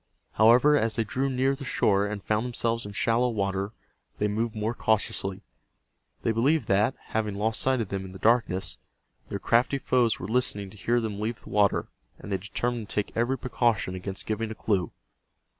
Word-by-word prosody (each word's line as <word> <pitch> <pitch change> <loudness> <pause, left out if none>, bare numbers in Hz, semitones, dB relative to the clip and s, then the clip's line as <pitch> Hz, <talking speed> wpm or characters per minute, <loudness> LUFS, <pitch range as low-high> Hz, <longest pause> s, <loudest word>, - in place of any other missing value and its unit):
However, 120 +7 +6
as 115 -6 +1
they 115 - +1
drew 130 +5 -1
near 135 +1 +1
the 135 - -9
shore 100 -5 +2
and 105 -1 -5
found 110 +1 0
themselves 115 -2 -1
in - - -7
shallow 115 +4 +2
water 100 -2 -1 0.5
they 105 - +1
moved 110 +2 -2
more 110 +2 -1
cautiously. 100 -4 -1 0.8
They - - +2
believed 135 +8 +2
that, 105 +6 +3
having 105 -2 -1
lost 110 +2 -1
sight 130 -2 +3
of 105 - -4
them 95 -1 -3
in 95 - -9
the 95 - -9
darkness, 95 - +1 0.5
their 100 - -2
crafty 120 +7 +2
foes 125 -4 +1
were - - -5
listening 105 -4 0
to 105 - -15
hear 120 +5 +1
them 110 -3 -3
leave 110 +2 -3
the - - -11
water, 100 -1 +2 0.3
and 105 - -9
they 95 - +1
determined 110 +3 -3
to - - -5
take 105 - -2
every 120 +3 +1
precaution 120 -7 0
against 95 +2 -4
giving 110 +1 -2
a 110 - -6
clue. 100 -6 0
110 Hz, 190 wpm, -27 LUFS, 100-120 Hz, 0.8 s, However